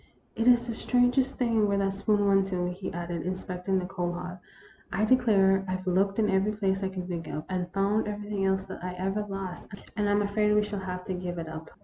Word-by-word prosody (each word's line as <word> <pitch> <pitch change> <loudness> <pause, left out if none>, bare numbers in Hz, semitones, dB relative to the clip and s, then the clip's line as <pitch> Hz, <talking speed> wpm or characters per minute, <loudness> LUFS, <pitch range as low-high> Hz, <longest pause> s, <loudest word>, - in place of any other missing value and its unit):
It 225 +1 0
is 240 -1 +6
the 235 - -3
strangest 250 +3 +2
thing 230 -4 +2
where 200 0 +1
that 195 -1 +1
spoon 205 +1 +1
went 195 -1 +4
to," 180 -2 -1
he 185 +2 -5
added, 170 -1 -4
inspecting 185 +2 -2
the 185 - -1
coal 180 -2 -2
hod. 180 +1 -6 0.3
" - - -27
I 215 - +1
declare, 200 -6 +4
I 185 - -1
Ve 185 0 -2
looked 195 +2 +2
in 220 -2 +3
every 195 +2 +2
place 195 -2 0
I 190 - 0
can 185 -1 -5
think 170 -3 -4
of, 155 - -4
and 180 -1 -3
found 200 +3 +1
everything 205 -1 -3
else 190 0 +2
that - - -8
I 180 0 -3
ever 195 +3 -1
lost, 190 -3 -5 0.3
and 210 -1 +1
I - - +3
'm 205 0 +3
afraid 210 +1 +2
we 210 - +4
shall 210 -1 -4
have 180 -1 -5
to 185 - -3
give 180 -1 -4
it 165 -1 -4
up." 160 0 -7
195 Hz, 245 wpm, -28 LUFS, 180-210 Hz, 0.3 s, is